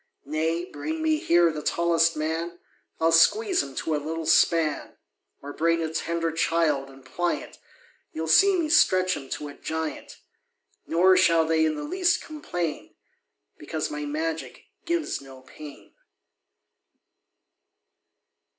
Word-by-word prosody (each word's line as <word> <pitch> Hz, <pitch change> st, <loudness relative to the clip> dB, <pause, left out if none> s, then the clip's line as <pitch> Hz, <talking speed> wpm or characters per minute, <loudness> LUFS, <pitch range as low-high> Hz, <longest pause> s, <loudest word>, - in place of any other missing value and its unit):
Nay, 160 Hz, +4 st, -1 dB
bring 315 Hz, -, -5 dB
me 315 Hz, -1 st, +2 dB
here 170 Hz, -, +3 dB
the 155 Hz, -1 st, -6 dB
tallest 165 Hz, +1 st, +1 dB
man, 165 Hz, +3 st, -3 dB, 0.4 s
I'll 165 Hz, 0 st, +3 dB
squeeze 380 Hz, -, +4 dB
him 135 Hz, -1 st, -8 dB
to 160 Hz, -, -2 dB
a -, -, +1 dB
little 160 Hz, +1 st, -4 dB
span; 160 Hz, -1 st, +2 dB, 0.5 s
Or 145 Hz, 0 st, -7 dB
bring 165 Hz, +1 st, +1 dB
a 160 Hz, 0 st, -4 dB
tender 165 Hz, 0 st, -2 dB
child, 160 Hz, -4 st, 0 dB
and 135 Hz, -1 st, -16 dB
pliant, 175 Hz, +6 st, -3 dB, 0.5 s
You'll 160 Hz, +1 st, -4 dB
see 390 Hz, -, +5 dB
me 325 Hz, -, 0 dB
stretch 185 Hz, -, +3 dB
him 135 Hz, -1 st, -9 dB
to 150 Hz, -, -5 dB
a -, -, -10 dB
giant: 160 Hz, +1 st, -5 dB, 0.7 s
Nor 185 Hz, +3 st, +4 dB
shall 165 Hz, -3 st, +4 dB
they 160 Hz, 0 st, +2 dB
in 155 Hz, -1 st, +1 dB
the 150 Hz, -, -5 dB
least 350 Hz, -, +1 dB
complain, 175 Hz, -, -5 dB, 0.6 s
Because 155 Hz, -1 st, -4 dB
my 150 Hz, 0 st, -4 dB
magic 160 Hz, +2 st, -4 dB, 0.2 s
gives 340 Hz, -, -2 dB
no 135 Hz, -1 st, -13 dB
pain. 145 Hz, +2 st, -13 dB
165 Hz, 135 wpm, -25 LUFS, 155-175 Hz, 0.7 s, see